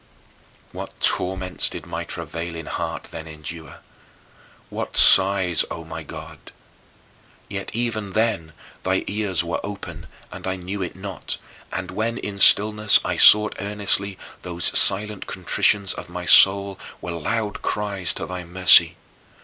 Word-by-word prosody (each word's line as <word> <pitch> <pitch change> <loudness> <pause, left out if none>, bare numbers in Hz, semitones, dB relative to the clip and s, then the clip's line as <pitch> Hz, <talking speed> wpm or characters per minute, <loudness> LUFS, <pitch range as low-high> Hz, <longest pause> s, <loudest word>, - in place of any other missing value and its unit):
What - - -9
torments 90 0 0
did - - -8
my - - -5
travailing 85 -1 -6
heart - - -5
then 80 -1 -8
endure! 80 +1 -10 0.9
What - - -5
sighs, 95 -3 +4
O 85 - -7
my 80 0 -8
God! 75 - -10 1.1
Yet 100 -1 -6
even 110 -4 -3
then 110 -8 -1 0.3
thy 95 +1 -1
ears 100 -5 -1
were 85 +1 -3
open 100 0 -8 0.2
and - - -8
I 95 - -2
knew 95 +2 -6
it 90 - -5
not, 95 0 -6 0.3
and - - -5
when 115 +2 -3
in 100 -1 -6
stillness 105 +1 +6
I - - -2
sought 105 0 +7
earnestly, 100 -1 0 0.2
those 85 -1 -1
silent 105 0 +1
contritions 95 +2 +1
of - - -9
my - - -7
soul 100 0 +5 0.2
were 90 - -6
loud 105 +6 -3
cries 100 -5 -2
to - - -4
thy 90 -1 -7
mercy. 85 -1 +5
95 Hz, 135 wpm, -22 LUFS, 85-105 Hz, 1.1 s, sought